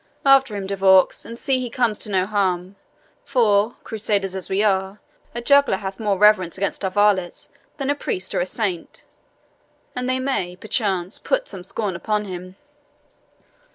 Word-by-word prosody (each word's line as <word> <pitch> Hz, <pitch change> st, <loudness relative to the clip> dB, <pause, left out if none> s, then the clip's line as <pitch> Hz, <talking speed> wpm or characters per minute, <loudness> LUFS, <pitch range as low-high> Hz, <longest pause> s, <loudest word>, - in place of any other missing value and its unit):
"After 270 Hz, -5 st, +5 dB
him, 200 Hz, -1 st, -4 dB
De 200 Hz, +1 st, -3 dB
Vaux, 190 Hz, -1 st, +4 dB
and 230 Hz, +1 st, -8 dB
see 265 Hz, 0 st, 0 dB
he 250 Hz, -1 st, -4 dB
comes 230 Hz, -4 st, 0 dB
to 215 Hz, -, -4 dB
no 185 Hz, -2 st, +1 dB
harm; 190 Hz, -2 st, -1 dB, 0.5 s
for, 220 Hz, -3 st, +2 dB
Crusaders 200 Hz, -3 st, -2 dB
as 190 Hz, -, -5 dB
we 195 Hz, +2 st, +1 dB
are, 195 Hz, 0 st, 0 dB, 0.4 s
a 240 Hz, -, -4 dB
juggler 280 Hz, -3 st, +4 dB
hath 190 Hz, -1 st, -6 dB
more 205 Hz, -3 st, 0 dB
reverence 200 Hz, -4 st, +4 dB
amongst 200 Hz, +1 st, -2 dB
our 190 Hz, -, +1 dB
varlets 195 Hz, -2 st, +1 dB, 0.3 s
than 275 Hz, -1 st, -1 dB
a -, -, +3 dB
priest 190 Hz, -9 st, -4 dB
or -, -, 0 dB
a 175 Hz, -, -1 dB
saint, 185 Hz, -5 st, -4 dB, 0.9 s
and 250 Hz, 0 st, -2 dB
they 255 Hz, -, +1 dB
may, 225 Hz, -10 st, -2 dB
perchance, 195 Hz, -2 st, -1 dB
put -, -, -1 dB
some 180 Hz, -, -9 dB
scorn 195 Hz, 0 st, -3 dB
upon 210 Hz, +3 st, -1 dB
him." 185 Hz, -1 st, -8 dB
205 Hz, 170 wpm, -22 LUFS, 190-230 Hz, 0.9 s, After